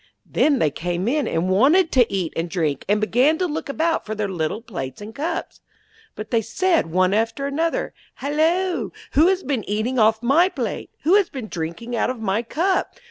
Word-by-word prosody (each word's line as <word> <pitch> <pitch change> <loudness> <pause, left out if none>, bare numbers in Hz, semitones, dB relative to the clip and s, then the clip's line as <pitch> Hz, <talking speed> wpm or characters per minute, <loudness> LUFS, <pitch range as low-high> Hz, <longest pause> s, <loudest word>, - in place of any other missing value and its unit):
Then 290 -3 +2
they 155 - +2
came 175 +5 -3
in, 290 +3 +1
and 165 +2 0
wanted 285 - +4
to 245 -3 +3
eat 185 -5 -2
and 165 +1 -2
drink, 160 -6 -1
and 210 +1 +3
began 250 +8 +3
to 365 - 0
look 310 -4 -4
about 320 +3 0
for 215 0 -5
their 210 -1 -1
little 185 +3 -3
plates 150 - -6
and 210 +2 -9
cups. 330 +7 -4 0.5
But 215 0 -7
they 230 - +3
said 350 - +1
one 185 +3 +2
after 225 +6 0
another: 320 +4 -1 0.2
'Halloa! 325 +6 0 0.2
who 310 +5 +5
has 380 0 +1
been 260 -5 -1
eating 220 +5 0
off 220 +1 +3
my 315 +9 +4
plate? - - -4
Who 330 - +3
has 400 -4 +2
been 250 -6 -7
drinking 170 +9 -5
out 225 - +1
of 255 -2 -4
my 215 0 0
cup? 350 +10 -1
235 Hz, 195 wpm, -22 LUFS, 200-310 Hz, 0.5 s, who